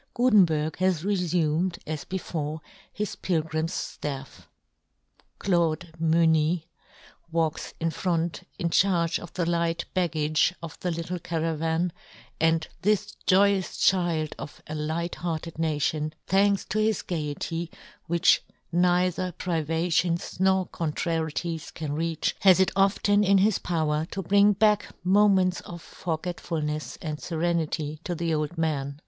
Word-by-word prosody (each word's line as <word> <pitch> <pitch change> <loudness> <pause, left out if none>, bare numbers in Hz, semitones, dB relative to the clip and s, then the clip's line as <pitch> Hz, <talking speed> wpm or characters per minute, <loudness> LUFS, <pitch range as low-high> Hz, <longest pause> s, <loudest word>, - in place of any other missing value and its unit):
Gutenberg 180 -11 +3
has 185 -3 +1
refumed, 175 -3 +1
as 155 -1 -4
before, 160 -4 -4 0.3
his 210 -1 -3
pilgrim's 160 -1 -2
ftafF. 135 -2 -6 0.9
Claude 170 -2 0
Mufny 160 0 +3 0.7
w^alks 160 -2 -1
in 165 0 0
front 170 0 -1 0.2
in 170 -1 -1
charge 175 -2 +2
of 175 - -10
the 175 - -1
light 170 0 0
baggage 160 -1 +1
of 165 -2 -8
the 180 - -2
little 170 +1 -3
caravan, 165 +1 -1 0.5
and 160 0 +2
this 210 +1 +1
joyous 195 0 +3
child 170 -5 +2
of 145 - -8
a 155 - -7
light 160 +3 -2
hearted 165 -1 -4
nation, 155 -1 0
thanks 200 +1 +3
to 215 - -1
his 215 -2 +1
gaiety, 165 +1 -3 0.4
which 170 +1 +4 0.3
neither 180 +1 +2
privations 170 +1 -1
nor 190 0 +3
contrarieties 165 0 -2
can 150 -3 -5
reach, 165 +1 -1
has 190 -2 +6
it 190 - +3
often 205 +1 +3
in 200 0 +5
his 200 +1 +3
power 155 -2 0
to 195 - -4
bring 200 +3 +5
back 210 0 +2
moments 190 -1 +4
of 170 -1 -9
forgetfulnefs 160 -2 -4
and 155 -2 -4
ferenity 160 -3 -1
to 175 - -3
the 165 0 -1
old 155 +2 -2
man. 145 -3 -1
170 Hz, 125 wpm, -26 LUFS, 160-185 Hz, 0.9 s, has